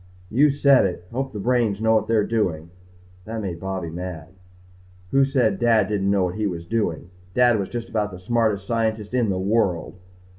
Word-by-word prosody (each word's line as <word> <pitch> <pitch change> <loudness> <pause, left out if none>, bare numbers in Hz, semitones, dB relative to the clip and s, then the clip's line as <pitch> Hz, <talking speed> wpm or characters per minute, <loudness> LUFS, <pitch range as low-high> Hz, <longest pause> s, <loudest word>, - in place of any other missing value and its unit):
"You 140 +7 +4
said 140 -5 +4
it. 90 -1 -6
Hope 135 +2 -3
the 105 - -7
brains 115 -2 +1
know 110 0 +3
what 110 - +2
they're 110 -2 +2
doing." 85 -8 -1 0.5
That 110 +1 -5
made 90 -5 -4
Bobby 95 -3 -4
mad. 85 -2 -6 0.8
Who 135 0 +4
said 135 -2 +1
Dad 115 -4 +3
didn't 100 -2 0
know 100 -1 +2
what 90 -1 -1
he 105 +1 -1
was 85 -3 -5
doing? 90 -5 -2 0.2
Dad 120 -3 +4
was 100 - -3
just 120 -1 -5
about 105 -2 -1
the 90 - -9
smartest 105 0 0
scientist 110 -1 -1
in 120 -4 +1
the 95 - 0
world. 95 -3 0
105 Hz, 190 wpm, -23 LUFS, 95-115 Hz, 0.8 s, You